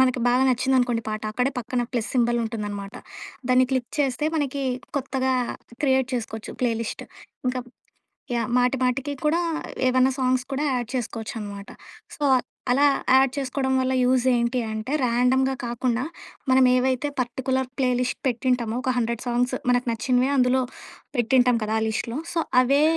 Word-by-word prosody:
మనకి 255 -1 +3
బాగా 250 +2 +3
నచ్చిందనుకోండి 255 -2 +2
పాట 215 0 -3
అక్కడే 250 +4 +1
పక్కన 245 +1 -2
ప్లస్ 240 -3 -2
సింబల్ 240 -1 +2
ఉంటుందన్నమాట. 205 -3 -5 0.5
దాన్ని 255 0 +5
క్లిక్ 255 -2 -1
చేస్తే 275 0 +1
మనకి 280 -2 -1 0.4
కొత్తగా 265 -1 -1 0.5
క్రియేట్ 265 -2 +2
చేసుకోవచ్చు 220 -2 -5
ప్లే 245 -2 +2
లిస్ట్. 225 - -5 0.4
ఇంకా 255 0 -1 0.7
యాహ్! 235 -2 -1
మాటి 250 +2 +2
మాటికి 265 +3 0
కూడా 325 +3 +3 0.5
ఏమైనా 255 +1 +4
సాంగ్స్ 255 0 +1
కూడా 275 +2 -1
యాడ్ 240 -2 -2
చేసుకోవచ్చనమాట. 215 -4 -5 0.5
సో - - -10 0.5
అలా 275 +4 +5 0.3
యాడ్ 265 -1 +4
చేసుకోవడం 265 -1 -1
వల్ల 260 0 0
యూజ్ 255 0 +3
ఏంటి 240 +1 +1
అంటే 220 +4 -4
ర్యాండమ్‌గా 250 +2 +2
కాకుండా 240 +1 -1 0.5
మనమేవైతే 255 +1 +3
పర్టిక్యులర్ 260 +1 -1
ప్లే 260 -2 +2
లిస్ట్ 250 0 -1
పెట్టుంటామో 245 -2 0
ఒక 260 - 0
100 235 -1 -1
సాంగ్స్ 245 +1 +1 0.2
మనకు 245 0 +2
నచ్చినవి 250 +3 +1
అందులో 255 0 +3 0.6
పెట్టింటాం 245 0 +3
కదా 215 +1 -1
ఆ - - -1
లిస్టులో. 230 +3 -2
సో 340 - -1 0.2
అవే 275 +3 +3
250 Hz, 145 wpm, -24 LUFS, 235-260 Hz, 0.7 s, దాన్ని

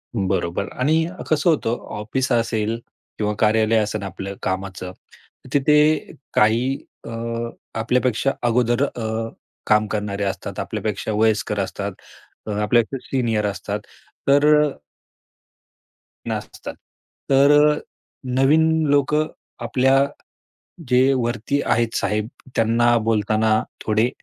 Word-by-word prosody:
बरोबर 95 -1 -1
आणि 160 +5 +3 0.2
कसं 155 +2 +3
होतं 120 -7 +1 0.2
ऑफिस 130 +5 -2
असेल 115 -1 0 0.4
किंवा 105 -1 0
कार्यालय 110 +1 +3
असेल 105 0 0
आपलं 95 +1 -6
कामाचं 95 -1 -3 0.6
तिथे 150 +2 +3 0.2
काही 115 +5 +3 0.3
अ, - - -6 0.7
आपल्यापेक्षा 125 +2 +1 0.2
अगोदर 120 +2 +2
अ, 115 -3 -3 0.4
काम 105 0 +4
करणारे 105 -1 -2
असतात. 95 -1 -4
आपल्यापेक्षा 105 0 -3
वयस्कर 105 -1 +1
असतात. 100 +1 -3 0.6
अ, 105 - -2
आपल्यापेक्षा 120 +4 +1
सीनियर 115 -5 0
असतात. 100 +1 -3 0.5
तर 145 +1 +5 0.2
अ 150 - +1 1.6
नसतात. - - -5 0.6
तर 140 +1 +5 0.2
अ, - - -5 0.6
नवीन 155 +4 +5 0.2
लोक 145 0 +2 0.5
आपल्या 130 +3 +3 0.8
जे 130 +2 +4
वरती 120 +2 -1
आहेत 115 0 +1
साहेब, 105 +1 0 0.3
त्यांना 120 +1 +3
बोलताना 110 0 +2 0.2
थोडे 110 +3 +2
115 Hz, 105 wpm, -22 LUFS, 105-130 Hz, 1.6 s, तर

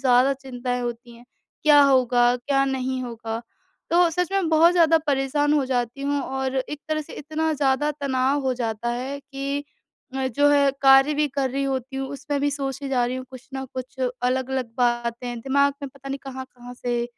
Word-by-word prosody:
ज़्यादा 255 +1 +4
चिंताएँ 250 -2 -4
होती 240 0 -6
हैं, 240 - -16 0.4
क्या 295 -1 +7
होगा? 250 -3 +4
क्या 275 +2 +1
नहीं 260 -1 -2
होगा? 230 -1 -5 0.5
तो 345 0 +5
सच 360 +3 -1
में 385 -4 +1
बहुत 325 +2 +5
ज़्यादा 330 -2 +5
परेशान 290 +1 +1
हो 290 -3 +3
जाती 245 0 -2
हूँ 285 0 0
और 265 0 -3
एक 290 +3 -3
तरह 310 0 0
से - - -13
इतना 315 +1 -2
ज़्यादा 285 +1 +1
तनाव 270 +1 +1
हो 260 -1 +1
जाता 230 -1 -3
है 260 +4 -4
कि 275 +1 -4 0.5
मैं 260 -1 -1
जो 290 +4 +4
है 280 -1 +4
कार्य 270 +2 +7
भी 300 0 +2
कर 270 -1 -1
रही 275 +2 -1
होती 265 0 -3
हूँ, 270 0 -3
उसमें 285 0 -3
भी 290 - +1
सोचे 275 0 -4
जा 250 -2 +2
रही 255 +1 -3
हूँ 255 - -6
कुछ 260 +1 -12
ना 265 0 -3
कुछ, 255 +1 -7
अलग-अलग 255 0 -1
बातें 240 0 -1
दिमाग 280 +2 +2
में 280 - -3
पता 275 0 -12
नहीं 275 +1 -3
कहाँ-कहाँ 255 -2 -9
से 240 -1 -2
265 Hz, 190 wpm, -24 LUFS, 250-280 Hz, 0.5 s, क्या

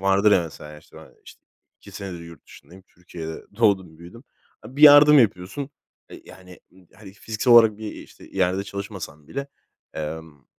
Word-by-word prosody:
vardır 100 +2 +2
ya 90 - +3
mesela, 75 -2 -11
işte, - - -21
ben, - - -15
işte, - - -16 0.4
2 - - -15
senedir 95 -4 -8
yurt 85 -1 -14
dışındayım. 95 +2 -17
Türkiye'de, 85 -3 -10
doğdum 95 -8 0
büyüdüm. 105 +10 -14 0.4
Bir 135 +6 -6
yardım 145 0 +8
yapıyorsun, 110 +6 -1 0.4
e, - - -12
yani, 90 -1 -16
ııı, 95 -1 -23
hani 100 -3 -14
fiziksel 110 +4 -1
olarak 115 -3 +6
bir 110 -1 -7
işte - - -15
yerde 95 +1 -1
çalışmasan 95 -7 -9
bile, 140 0 -6 0.5
emm, 80 -2 -8
95 Hz, 160 wpm, -22 LUFS, 85-110 Hz, 0.5 s, yardım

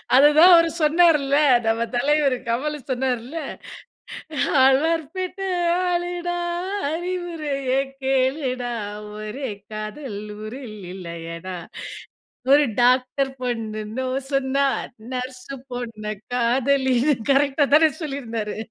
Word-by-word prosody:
அதுதான் 300 +6 +7
அவர் 335 -1 +7
சொன்னார்ல, 300 -3 +4 0.3
நம்ம 225 +1 +1
தலைவரு 280 0 +2
கமலு 290 +6 -1
சொன்னார்ல, 255 +2 -2 1.3
"அல்வார் 315 +5 +3
பேட்ட 370 +1 -4 0.5
ஆளுடா 350 0 -1 0.6
அறிவுரைய 325 -6 -3 0.3
கேளுடா, 260 -2 0 0.5
ஒரே 240 +5 -5 0.2
காதல் 215 +1 -5 0.2
ஊரில் 220 0 -7 0.2
இல்லையடா. 170 0 -7 1.0
ஒரு 290 +1 +7 0.2
டாக்டர் 255 +2 +2
பொண்ணு 225 -4 -3 0.2
நோ 260 0 -1 0.3
சொன்னா, 275 +1 +2 0.5
நர்சு 255 +1 -5 0.2
பொண்ண 230 -3 -6 0.3
காதலின்னு." 260 +2 +2 0.2
கரெக்ட்டா 280 +1 +3
தானே 315 +1 +6
சொல்லியிருந்தாரு. 235 -8 -4
265 Hz, 85 wpm, -23 LUFS, 240-300 Hz, 1.3 s, அதுதான்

